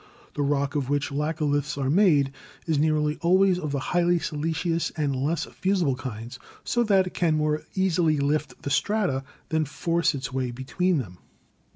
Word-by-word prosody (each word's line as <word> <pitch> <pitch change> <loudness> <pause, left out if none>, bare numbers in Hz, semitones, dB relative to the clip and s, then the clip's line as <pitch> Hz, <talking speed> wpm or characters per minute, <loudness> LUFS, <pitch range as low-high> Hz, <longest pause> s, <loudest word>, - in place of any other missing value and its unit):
The - - -2
rock 140 0 0
of 140 -4 -1
which 145 0 0
laccoliths 150 -1 -1
are 135 -1 0
made 155 -7 +4 0.3
is 160 -3 +1
nearly 150 0 +1
always 185 +1 +4
of 155 -5 -3
the 140 - -1 0.2
highly 175 0 +3
siliceous 165 +2 -1
and 145 -3 0
less 150 +5 -1
fusible 185 -8 0
kinds, 120 -2 -7 0.2
so 240 - 0
that 195 -3 +4
it 180 - -6
can 160 -3 +1
more 150 0 0
easily 175 -5 +2
lift 140 -2 -1
the 140 - -3
strata 180 -5 +1 0.3
than 160 0 +1
force 165 +2 0
its 130 -2 -5
way 130 -1 -1
between 145 +9 0
them. 90 -9 -5
150 Hz, 170 wpm, -26 LUFS, 140-170 Hz, 0.3 s, made